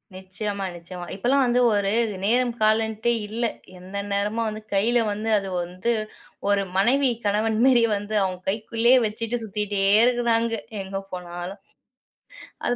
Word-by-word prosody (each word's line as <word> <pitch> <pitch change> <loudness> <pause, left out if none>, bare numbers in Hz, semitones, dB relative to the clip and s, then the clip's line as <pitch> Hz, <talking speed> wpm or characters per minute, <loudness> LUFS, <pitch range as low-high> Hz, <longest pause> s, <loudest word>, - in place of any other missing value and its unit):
நிச்சயமா 195 +1 -4
நிச்சயமா. 175 +1 -8
இப்பலாம் 260 +7 +2
வந்து 245 +1 +2
ஒரு 200 -1 +1 0.3
நேரம் 240 +3 +2
காலம்டே 220 +1 +2
இல்ல. 225 +3 -4 0.4
எந்த 190 +2 -8 0.2
நேரமும் 210 +3 0
வந்து, 215 0 -5
கைல 225 +5 +3
வந்து, 215 +2 -3
அது 195 -1 -6
வந்து, 185 +7 -2 0.6
ஒரு 200 -1 +2
மனைவி 260 +7 +3 0.2
கணவன் 215 +2 +1
மேரி 250 -3 +5
வந்து 205 +1 -5
அவங்க 185 -1 -2
கைக்குள்ளயே 230 +4 +2
வச்சிட்டு 230 +2 -3
சுத்திட்டே 205 -1 -2 0.2
இருக்கிறாங்க! 235 -2 +1 0.3
எங்க 195 0 -5
போனாலும். 180 +2 -6 1.0
அது 245 - +1
215 Hz, 130 wpm, -24 LUFS, 195-235 Hz, 1.0 s, மேரி